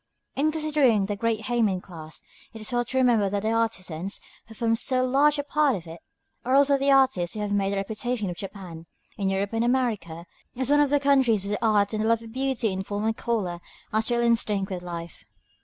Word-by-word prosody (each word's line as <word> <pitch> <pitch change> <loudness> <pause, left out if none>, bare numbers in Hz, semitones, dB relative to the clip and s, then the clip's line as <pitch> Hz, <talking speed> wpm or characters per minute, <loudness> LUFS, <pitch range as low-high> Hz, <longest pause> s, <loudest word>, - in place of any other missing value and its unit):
In 305 +3 +2
considering 295 -9 +2
this 200 0 -4
great 230 -1 0
héimin 220 -4 +1
class, 160 -4 -10 0.3
it 225 - -9
is 215 - -3
well 240 0 +1
to 260 - -4
remember 235 -6 +3
that 200 +1 -2
the 220 - +1
artisans, 195 -5 -2 0.3
who 225 - -13
form 230 0 +1
so 255 +2 +1
large 285 +3 +3
a 285 - -1
part 290 -2 +2
of 175 -3 -7
it, 165 +1 -10 0.4
are 255 +2 +1
also 280 0 +5
the 275 0 +1
artists 260 -11 +3
who - - -4
have 205 -1 -3
made 200 -1 +1
the - - -1
reputation 215 +2 -2
of 175 - -4
Japan, 180 -4 -9 0.3
in 195 -2 -1
Europe 195 +2 -1
and 225 +1 +1
America, 220 -10 -1 0.3
as 260 +1 +1
one 290 0 +5
of 290 - +3
the 290 +1 +3
countries 260 -8 +3
where 205 - 0
art 210 -2 +2
and 215 0 -1
the - - 0
love 230 0 +2
of 225 -1 -11
beauty 260 -5 -1
in 190 0 -3
form 205 +2 -3
and 225 0 +1
color 205 -8 -2 0.3
are 220 - +3
still 235 +1 0
instinct 215 -4 +1
with 180 -1 -4
life. 170 - -8
220 Hz, 225 wpm, -25 LUFS, 195-255 Hz, 0.4 s, also